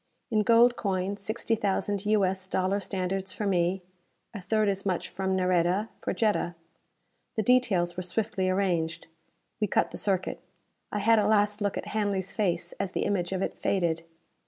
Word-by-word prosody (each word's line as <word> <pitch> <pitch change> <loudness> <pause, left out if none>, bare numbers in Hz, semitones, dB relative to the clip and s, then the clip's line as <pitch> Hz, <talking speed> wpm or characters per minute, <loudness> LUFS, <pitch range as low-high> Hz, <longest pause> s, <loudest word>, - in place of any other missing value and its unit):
In 215 -1 +3
gold 235 +2 +5
coin, 195 0 -1
sixty 220 +3 -2
thousand 205 -1 -1
U. 210 -2 +4
S. 190 0 -2
dollar 190 +1 0
standards 190 0 -2
for 210 - -4
me; 180 -1 +1 0.5
a 205 - -6
third 215 +3 +1
as 195 -1 0
much 185 -3 -1
from 190 0 -2
Nareda, 185 +3 +1
for - - -2
Jetta. 210 -5 0 0.8
The 220 - 0
details 200 -8 +2
were - - -1
swiftly 190 +1 -1
arranged. 175 -4 0 0.5
We 210 - +1
cut - - +1
the - - -5
circuit. 190 -2 -1 0.5
I - - -2
had 220 +2 +4
a 205 - +2
last 210 0 +3
look 205 -1 0
at - - -5
Hanley's 200 -3 -1
face 180 -6 0
as 195 -2 -2
the - - -1
image 180 -3 0
of 190 0 -1
it - - -2
faded. 170 -4 0
195 Hz, 175 wpm, -28 LUFS, 185-210 Hz, 0.8 s, gold